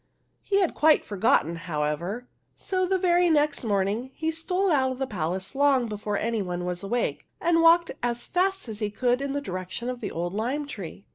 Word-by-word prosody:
He 400 -1 +1
had 365 - +1
quite 310 0 +4
for 205 - -7
gotten, 175 -4 +3
however; 170 +7 -3 0.3
so 370 -1 -1
the 380 +1 +2
very 355 -1 +3
next 300 -3 +2
morning 205 +3 0
he 320 0 -1
stole 360 +4 0
out 260 -3 +3
of 260 - -5
the 265 - -1
palace 185 -3 -3
long 275 -2 +3
before 210 -1 -3
any 225 0 -1
one 180 -2 -3
was 180 0 -3
awake, 235 +5 -2
and 330 0 +3
walked 335 +1 +5
as 240 0 -2
fast 380 -2 0
as 220 -2 -5
he 210 -2 -1
could 245 +4 0
in 280 0 -2
the 285 - -1
direction 185 +2 -5
of 250 - -7
the - - -3
old 175 +2 -3
lime 250 +8 -1
tree. 200 - -8
245 Hz, 205 wpm, -26 LUFS, 195-315 Hz, 0.3 s, walked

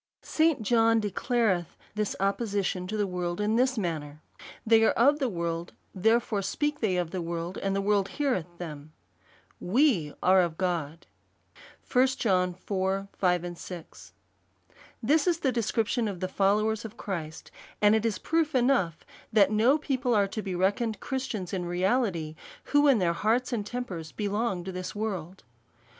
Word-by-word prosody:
St. 315 -7 +1
John 225 0 +4
declareth 210 -3 0 0.2
this 210 -1 -2
opposition 195 -2 -1
to 215 +3 -3
the 205 - +1
world 180 -1 -3
in 210 +1 +1
this 255 +1 +2
manner, 155 -6 -3 0.5
Thej/ 225 0 +6
are - - +4
of 285 +5 +4
the 265 -4 0
world: 170 -2 -3 0.2
therefore, 225 +1 +2
speak 295 +10 -1
they 195 -5 +1
of 175 -2 -1
the 185 -1 -3
world, 170 +2 -4
and 195 0 -1
the 195 - +1
world 200 -1 +2
heareth 185 - -2
them. 155 -3 -8 0.7
fVe 195 - +2
are 185 0 +6
of 170 -2 -2
God, 170 -4 -2 0.9
1 255 0 +5
John 180 -4 +1
iv. 195 0 -1
5. 175 -1 -2 1.2
This 295 +8 +3
is 340 -2 +1
the 265 - +2
description 230 0 0
of 195 -4 -5
the 185 - -2
followers 210 +3 +1
of 225 +1 -9
Christ; 160 -6 -6 0.3
and 210 0 +5
it 220 -1 +2
is 225 -4 0
proof 320 - 0
enough 245 - +1 0.3
that 205 -2 +5
no 230 +7 +4
people 260 -5 0
are 200 -1 +3
to 215 - -4
be 190 -3 -4
reckoned 205 +5 0
Christians 240 -9 -4
in 180 -2 -2
reality, 180 -3 0 0.3
who 290 0 +3
in 270 -4 +6
their 175 -4 +1
hearts 230 +8 0
and 220 -3 -1
tempers 200 -8 -5
belong 205 -2 -2
to 190 - -5
this 185 +3 -6
world. 190 -4 -4
200 Hz, 160 wpm, -28 LUFS, 180-235 Hz, 1.2 s, Thej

